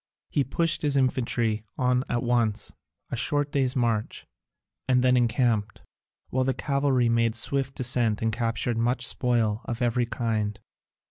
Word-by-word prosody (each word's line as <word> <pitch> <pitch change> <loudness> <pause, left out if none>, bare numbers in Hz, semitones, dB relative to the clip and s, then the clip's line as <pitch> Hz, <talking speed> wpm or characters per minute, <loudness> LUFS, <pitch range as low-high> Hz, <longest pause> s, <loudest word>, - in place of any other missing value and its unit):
He 145 - +2
pushed 165 +6 0
his 145 -2 +1
infantry 120 -4 0
on 125 0 +2
at 120 +1 -1
once, 120 -3 0 0.4
a - - -1
short 145 +4 -1
day's 135 -3 +1
march, 115 -4 -1 0.6
and 125 -1 +3
then 125 0 +4
encamped, 115 -4 +1 0.5
while 130 0 +1
the 130 -1 0
cavalry 140 -3 +1
made 115 -1 +2
a - - -3
swift 135 +2 -1
descent 120 -4 +1
and 115 -1 -1
captured 115 0 -1
much 120 +1 +1
spoil 115 -4 +1
of 120 - -4
every 120 0 +1
kind. 110 -4 -2
120 Hz, 150 wpm, -26 LUFS, 115-130 Hz, 0.6 s, then